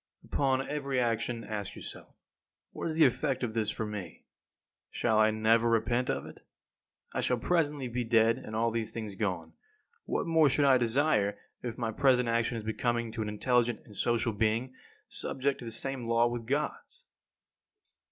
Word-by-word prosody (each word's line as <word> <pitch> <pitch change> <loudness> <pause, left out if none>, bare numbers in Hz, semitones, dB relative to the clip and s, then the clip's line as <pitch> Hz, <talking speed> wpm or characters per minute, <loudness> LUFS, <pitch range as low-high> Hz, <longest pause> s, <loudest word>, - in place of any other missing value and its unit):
2. - - -18
Upon 135 -1 +1
every 140 -3 -1
action 115 0 -1
ask 105 -2 -5
yourself, - - -9 0.6
what - - -4
is 160 - -2
the 160 -1 +6
effect 135 +1 0
of 115 -3 -2
this 110 -2 0
for 110 - -3
me? 105 -3 -7 0.6
Shall 110 -2 +1
I 110 0 +6
never 110 +2 +3
repent 120 +2 +1
of - - -1
it? - - -11 0.7
I - - -1
shall 125 - +1
presently 145 -1 0
be 120 +1 -2
dead, 115 0 +3
and 110 - -7
all 115 +1 +1
these 115 -1 -2
things 110 -3 -5
gone. 90 -6 -3 0.5
What - - -1
more 160 -3 +4
should 145 +2 +2
I 130 -2 +6
desire 115 -4 +2 0.2
if 120 -1 -5
my 115 -2 -1
present 125 0 +3
action 115 +1 +1
is 110 - -5
becoming 115 +1 -1
to 115 0 -4
an 105 - -2
intelligent 120 +2 +1
and - - -17
a - - -11
social 115 +2 0
being, 115 +5 0 0.3
subject 135 +1 -2
to 120 - -8
the 115 - -5
same 130 +1 -3
law 115 0 +4
with 120 -1 -3
Gods? 460 - -3
115 Hz, 180 wpm, -30 LUFS, 110-130 Hz, 0.7 s, the